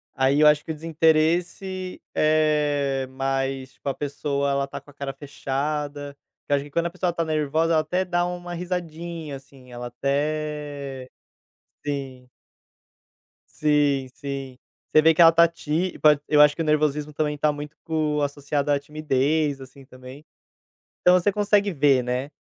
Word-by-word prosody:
Aí 135 +2 +2
eu 150 - +7
acho 150 0 +4
que - - -16
o - - -2
desinteresse 165 +4 0
é, 150 -3 +1
mais, 135 0 -2
tipo, 140 - -5
a - - -2
pessoa 140 -1 -2
ela 140 0 0
está 140 - -7
com 145 - -18
a - - -23
cara 140 -1 -5
fechada, 145 +1 -4 0.3
que - - -10
eu - - +6
acho 140 - -1
que - - -12
quando 170 +4 -1
a - - 0
pessoa 180 0 -1
está 170 -1 -1
nervosa 155 +1 +1
ela 155 - +4
até 185 +3 -1
dá 175 -1 0
uma 175 0 -5
risadinha, 170 -3 -5
assim, 135 -2 -17
ela 120 0 -6
até 145 0 -3 0.8
sim. 135 -3 -5 1.3
Sim, 145 -3 +2
sim. 135 -2 -6 0.3
Você 155 - +6
vê 160 +1 +6
que 160 - +3
ela 165 - +10
está 170 +1 +5
tí 170 +2 -2
pod 150 -2 +5
eu 150 -1 +5
acho 150 0 +6
que 165 - -3
o - - -4
nervosismo 150 -1 +1
também 150 0 -1
está 150 +1 +2
muito 150 +1 -8
co 155 -2 -1
associada 145 0 -1
à 140 - +1
timidez, 150 0 0
assim, 135 +1 -13
também. 130 +2 -13 0.8
Então 180 - +6
você 190 +3 +2
consegue 205 0 +2
ver, 140 -5 +3
né. 125 +3 -2
150 Hz, 170 wpm, -24 LUFS, 140-160 Hz, 1.3 s, ela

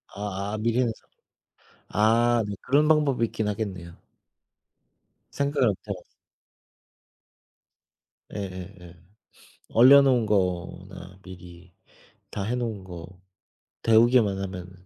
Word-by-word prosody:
아 100 0 -4
아, - - -2
미리 115 +3 0
해서. 120 -2 0 1.0
아, 115 +2 +2
네, 100 - -5
그런 145 +4 +2
방법이 150 -6 +2
있긴 110 -1 -3
하겠네요. 95 -5 -5 1.3
생각을 140 -2 0
못 100 - -2
해 100 - -2
봤어. 90 - -12 2.3
예예예. 90 -3 -8 0.8
얼려 130 +5 +8
놓은 130 -4 +2
거나 90 -2 -3
미리 90 -1 -13 0.6
다 100 - -4
해 115 +5 -2
놓은 115 -5 -4
거 85 -3 -9 0.8
데우기만 115 -3 +4
하면은 90 -2 -7
105 Hz, 200 characters per minute, -25 LUFS, 95-120 Hz, 2.3 s, 얼려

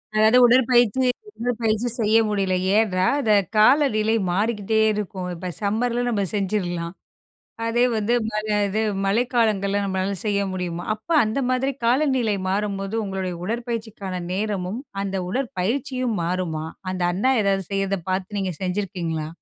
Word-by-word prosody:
அதாவது 220 +3 +5
உடற்பயிற்சி, 245 0 +4 0.3
உடற்பயிற்சி 230 -1 0
செய்ய 220 0 +4
முடியல. 195 -3 0 0.2
ஏன்னா, 185 -4 +1 0.2
அந்த 220 -5 +3 0.2
காலநிலை 220 -2 +4 0.2
மாறிக்கிட்டே 215 +2 +1
இருக்கும். 195 -3 -4
இப்போ 180 +2 -5
சம்மர்ல 235 +4 0
நம்ம 210 -4 0
செஞ்சிர்லாம். 180 -4 -2 0.7
அதே 235 +1 +2
வந்து 220 +2 0
ம - - -3 0.2
க 215 - -1 0.2
இது 210 +3 -1 0.3
மழைக்காலங்கள்ல 210 -3 +1
நம்மளால 190 0 -1
செய்ய 200 -1 +1
முடியுமா? 175 -2 -4
அப்ப 215 +9 -17
அந்த 215 +5 -2
மாதிரி 255 +2 +1
காலநிலை 250 -4 +2
மாறும்போது 195 +1 -2
உங்களுடைய 190 -2 -3
உடற்பயிற்சிக்கான 220 -4 -4
நேரமும், 200 +1 -2 0.2
அந்த 195 -1 -3
உடற்பயிற்சியும் 250 +2 -2
மாறுமா? 170 -3 -2 0.3
அந்த 185 -1 -3
அண்ணா 235 +9 +2
ஏதாவது 195 -1 +1
செய்யிறத 195 0 0
பாத்து 190 +2 -2
நீங்க 190 -2 -1
செஞ்சிருக்கீங்களா? 180 -5 -2
210 Hz, 125 wpm, -23 LUFS, 190-230 Hz, 0.7 s, அதாவது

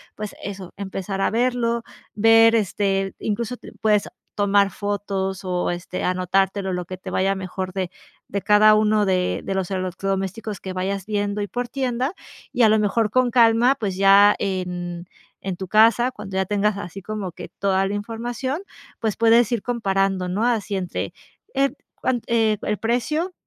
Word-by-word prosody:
pues 210 -1 -6
eso, 195 -2 -7
empezar 195 0 -4
a - - +2
verlo, 235 0 +1 0.3
ver 225 +1 +6
este, 195 -2 0
incluso 230 +3 -2
t - - -12
puedes 210 -2 +2 0.3
tomar 200 -1 +3
fotos, 200 -1 -3
o 180 -1 -1
este 175 +1 -5
anotártelo, 190 +2 0
lo 180 -1 -3
que 185 - -6
te 185 +1 -8
vaya 195 +1 +1
mejor 185 0 -5
de 185 -2 -3 0.4
de 200 - -2
cada 210 +1 +6
uno 215 0 +3
de 185 -2 0
de - - -3
los 190 -2 -1
electrodomésticos 195 +3 -3
que 190 - -5
vayas 190 +1 -2
viendo, 205 -1 -1
y 205 - -2
por 245 0 -3
tienda. 260 +2 -1 0.4
Y 245 - +1
a 220 - +7
lo 215 0 +4
mejor 210 +1 +1
con 255 0 +2
calma, 235 +2 +5
pues 195 -6 -3
ya 200 +1 +7
en 180 -2 -3 0.3
en 190 -2 -4
tu 190 - -6
casa 230 +5 +4
cuando 195 -4 -7
ya 190 - +1
tengas 205 +1 +1
así 195 -1 -7
como 205 -1 -5
que - - -9
toda 195 -1 +2
la 205 - -2
información, 240 - -3 0.4
pues 220 -3 -1
puedes 230 0 +4
ir 235 -4 0
comparando, 195 -5 0
no 205 +6 0
así 220 -4 0
entre, 180 -2 -3 0.4
en, 275 0 +1 0.2
cuant 245 -3 -1
eh, 225 -2 +2
el 210 - -1
precio, 300 +10 -1
205 Hz, 170 wpm, -22 LUFS, 190-225 Hz, 0.4 s, a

